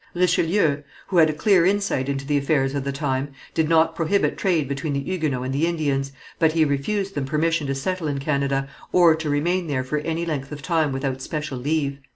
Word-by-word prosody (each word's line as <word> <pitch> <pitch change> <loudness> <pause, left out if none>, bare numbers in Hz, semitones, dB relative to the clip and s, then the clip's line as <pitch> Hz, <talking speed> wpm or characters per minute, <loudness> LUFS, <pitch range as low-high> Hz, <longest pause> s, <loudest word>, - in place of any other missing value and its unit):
Richelieu, 175 -3 +2 0.3
who 185 - 0
had 160 -2 +6
a - - 0
clear 180 +3 +3
insight 195 -8 +1
into 140 0 -2
the 145 +1 0
affairs 140 -1 +1
of 140 -2 -2
the 140 - -2
time, 135 0 -2 0.2
did 160 -1 +1
not 165 0 +3
prohibit 190 +5 +1
trade 170 -7 +1
between 140 +2 -3
the 140 - 0
Huguenots 140 -4 -2
and 130 - -2
the 150 +5 +1
Indians, 140 -5 -1 0.3
but 160 -2 +3
he 160 -1 +3
refused 195 +8 -1
them 140 -2 -2
permission 155 +2 0
to 135 - -1
settle 170 +4 -2
in 145 -1 -1
Canada, 140 -1 0 0.2
or 175 -3 +6
to 160 -1 -4
remain 170 +5 0
there 135 -3 -1
for 150 +4 -2
any 165 +2 -2
length 140 -4 -3
of 145 -1 -7
time 160 -3 +1
without 135 -1 -3
special 150 -2 -4
leave. 140 0 -1
150 Hz, 210 wpm, -23 LUFS, 140-165 Hz, 0.3 s, had